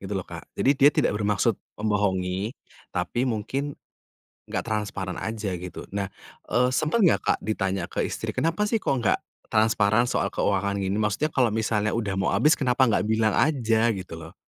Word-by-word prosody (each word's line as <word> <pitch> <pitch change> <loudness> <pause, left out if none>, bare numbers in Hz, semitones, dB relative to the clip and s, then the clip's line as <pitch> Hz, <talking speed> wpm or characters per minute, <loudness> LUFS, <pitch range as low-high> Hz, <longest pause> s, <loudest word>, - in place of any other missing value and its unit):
gitu 100 +1 -6
loh, 95 - -3
Kak, 85 -1 -9
jadi 135 - +3
dia 140 +2 +7
tidak - - +1
bermaksud 105 +1 +1 0.2
membohongi, 100 -1 0 0.4
tapi 120 +8 -1
mungkin 130 +5 -2 0.7
nggak - - -3
transparan 105 -4 -3
aja 110 -3 -3
gitu. 90 +1 -8
Nah, 100 0 -2 0.4
eee, 125 +1 +3
sempet 155 - +1
nggak, 180 - +4
Kak, - - +3
ditanya 95 -4 -2
ke - - -1
istri, - - -4
kenapa 165 +5 +1
sih 230 - +2
kok 195 - 0
nggak 110 - +3 0.3
transparan 110 +1 +3
soal - - 0
keuangan 100 0 0
gini? 95 0 -1
Maksudnya 110 +9 0
kalau 125 -4 +3
misalnya 110 -1 0
udah 105 -4 -1
mau 95 0 0
habis, 135 +10 +5
kenapa 130 -1 +2
nggak 110 -3 +1
bilang 110 -1 +2
aja 115 -6 +2
gitu 95 -3 -7
loh. 80 0 -10
110 Hz, 175 wpm, -25 LUFS, 100-125 Hz, 0.7 s, dia